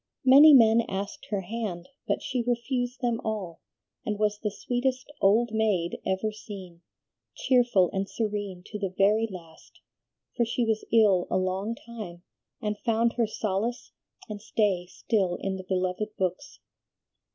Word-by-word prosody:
Many 280 +4 +9
men 230 -2 +6
asked 200 +1 -5
her 205 -2 -1
hand, 200 -2 -5 0.2
but - - -1
she 255 -2 -1
refused 245 +1 -2
them 240 -2 0
all, 200 -7 -4 0.4
and 210 -1 -2
was 210 0 0
the 210 - -1
sweetest 255 +6 -2
'old 220 +4 +4
maid' 205 -6 0
ever 190 +3 -1
seen, 190 -5 -10 0.5
cheerful 240 -8 +3
and 195 +1 -2
serene 205 -5 -3
to 210 - -7
the 195 -2 -1
very 210 +3 +3
last, 165 -4 -13 0.6
for 240 - +2
she 235 +1 0
was 220 -1 0
ill 205 -6 +4
a - - +1
long 190 +4 -1
time, 210 -8 -9 0.4
and 210 -1 -3
found 230 0 +1
her 235 -3 +1
solace 215 +4 -3 0.4
and 210 -2 -7
stay 200 -5 0
still 190 -2 -1
in 190 +1 -3
the 185 - -7
beloved 185 +3 -1
books. 185 +9 -3
210 Hz, 150 wpm, -27 LUFS, 190-230 Hz, 0.6 s, Many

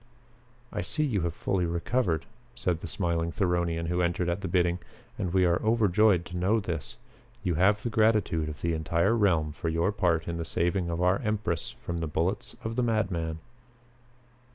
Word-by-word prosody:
"I 105 - -1
see 155 - 0
you 110 -9 0
have 85 -1 -2
fully 90 -3 0
recovered," 85 - 0 0.3
said 90 -8 -1
the 85 - -6
smiling 85 -1 -1
Theronian 85 -2 0
who 90 +1 0
entered 85 0 0
at 85 +3 -1
the 95 - -3
bidding, 90 0 +2 0.4
"and 90 - -2
we 95 0 +3
are 85 0 +2
overjoyed 105 -4 +3
to 90 - -6
know 100 +6 +2
this. 85 - -5 0.5
You 90 - +1
have 100 +6 +3
the 120 - -2
gratitude 105 -8 +2
of 75 - -8
the 85 0 0
entire 85 +6 +1
realm 85 -8 +2
for 80 - -3
your 85 +4 +1
part 90 -5 +1
in 85 0 -2
the 85 - -2
saving 85 +2 0
of 85 +1 -1
our 90 +2 +3
empress 105 - -2
from 85 -1 -2
the 80 - -2
bullets 85 +6 -2
of 115 +1 -4
the - - +3
madman." 90 -8 0
90 Hz, 185 wpm, -28 LUFS, 85-100 Hz, 0.5 s, we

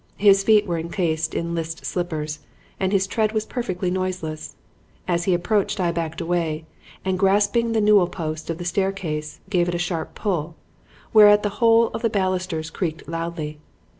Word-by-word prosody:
His 195 -1 +5
feet 210 0 +5
were 170 -3 -2
encased 160 -1 -1
in 170 0 -2
list 165 -1 -4
slippers 155 -4 -3 0.4
and 190 -1 0
his 195 -2 +2
tread 215 +2 0
was 215 -1 0
perfectly 185 -8 -3
noiseless. 180 -4 -3 0.5
As 175 -1 0
he 185 - +3
approached 205 +3 0
I 175 -2 +2
backed 165 -1 -3
away, 165 -2 -1 0.4
and 190 -1 0
grasping 205 +4 +2
the 220 - +2
newel 205 -3 +5
post 160 -3 -5
of 165 - -2
the 175 - -6
staircase 170 -5 -2
gave 175 -2 +2
it 175 - -2
a - - 0
sharp 175 -1 -3
pull, 170 -6 -2 0.6
whereat 210 -1 +7
the 205 - +1
whole 230 0 +5
of - - -5
the 230 - +2
balusters 185 -5 -1
creaked 165 -2 -4
loudly. 165 -2 -4
180 Hz, 170 wpm, -23 LUFS, 165-200 Hz, 0.6 s, whereat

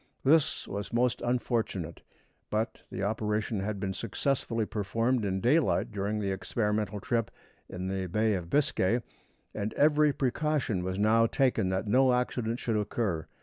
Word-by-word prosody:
This 150 +2 +3
was 100 +1 -5
most 120 +1 +1
unfortunate; 115 -8 -1 0.5
but 110 +2 -1
the 95 - -4
operation 105 0 -1
had 100 +1 -3
been 95 0 -2
successfully 115 +1 -1
performed 115 +4 0
in 95 -1 -1
daylight 145 - +2
during 105 +1 -2
the 100 -2 -1
experimental 105 +1 -1
trip 115 +3 -1 0.4
in 90 0 -5
the 95 -1 -2
Bay 110 +4 +1
of 90 -3 -3
Biscay, 120 - +2 0.5
and 105 0 -3
every 150 0 +4
precaution 135 -7 0
was 95 +1 -3
now 110 +2 +4
taken 125 -7 +1
that 95 +2 -1
no 125 +4 +4
accident 125 -2 -1
should 115 -3 -1
occur. 105 -5 -1
110 Hz, 145 wpm, -29 LUFS, 100-125 Hz, 0.5 s, every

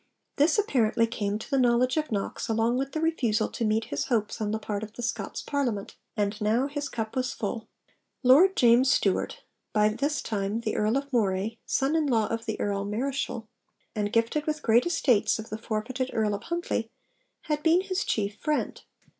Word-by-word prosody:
This 305 +6 +4
apparently 235 - +2
came 210 -3 -2
to 220 - -9
the 275 -1 +1
knowledge 250 0 +3
of 310 -3 -1
Knox 200 -2 -2
along 225 +2 +1
with 275 0 -3
the 315 - -1
refusal 295 -10 +1
to 235 - -4
meet 220 +1 +1
his 140 0 -1
hopes 220 -2 -1
on 210 - 0
the 215 - 0
part 210 -1 -4
of 215 -1 -7
the 240 - -7
Scots 230 - -3
Parliament; 245 -9 -2 0.2
and 205 0 -1
now 220 +5 +2
his 285 0 -4
cup 220 0 -4
was 255 -1 -1
full. 220 +1 -4 0.6
Lord 315 +10 +6
James 245 +2 +5
Stewart, - - +1 0.3
by 210 0 +4
this 275 +7 -1
time 210 +1 -2
the 220 - -2
Earl 215 +4 +2
of 280 0 -5
Moray, 210 0 0
son 275 +4 +1
in 315 -2 +2
law 225 -5 +2
of 230 +1 -3
the 220 - -3
Earl 200 -1 -1
Marischal, 230 +1 -3 0.5
and 205 -1 -2
gifted 230 +7 +1
with 305 -1 -2
great 235 +6 +4
estates 245 -11 +2
of 220 -1 -8
the 215 - -3
forfeited 240 +4 -3
Earl 215 -2 +1
of 200 - -5
Huntly, 340 -9 -2 0.5
had 300 -1 -2
been 330 +3 +4
his 385 0 -2
chief 205 -1 -1
friend. 305 -1 -2
230 Hz, 195 wpm, -27 LUFS, 215-275 Hz, 0.6 s, Lord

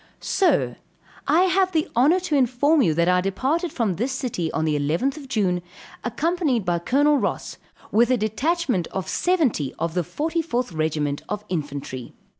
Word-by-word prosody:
Sir 385 - +1 0.5
I 330 - +4
have 375 0 +2
the 315 -1 +1
honor 290 +10 +4
to 355 -5 -1
inform 275 +4 +3
you 160 -10 +2
that 170 +1 +2
I 180 0 +4
departed 270 - -1
from 225 -8 0
this 245 +7 -1
city 240 - -2
on 160 - -1
the 155 -1 +1
11th 250 - -1
June, 190 -8 0 0.4
accompanied 285 - 0
by 175 -1 +1
Col. 290 - +3
Ross, - - -3 0.3
with 235 +2 +4
a 255 - +3
detachment 245 - 0
of 190 - -5
seventy 295 - 0
of 165 -1 -2
the 180 - +1
44th 295 - -2
regiment 150 -2 -1
of 210 0 -4
infantry. 145 -6 -5
240 Hz, 160 wpm, -23 LUFS, -, 0.5 s, I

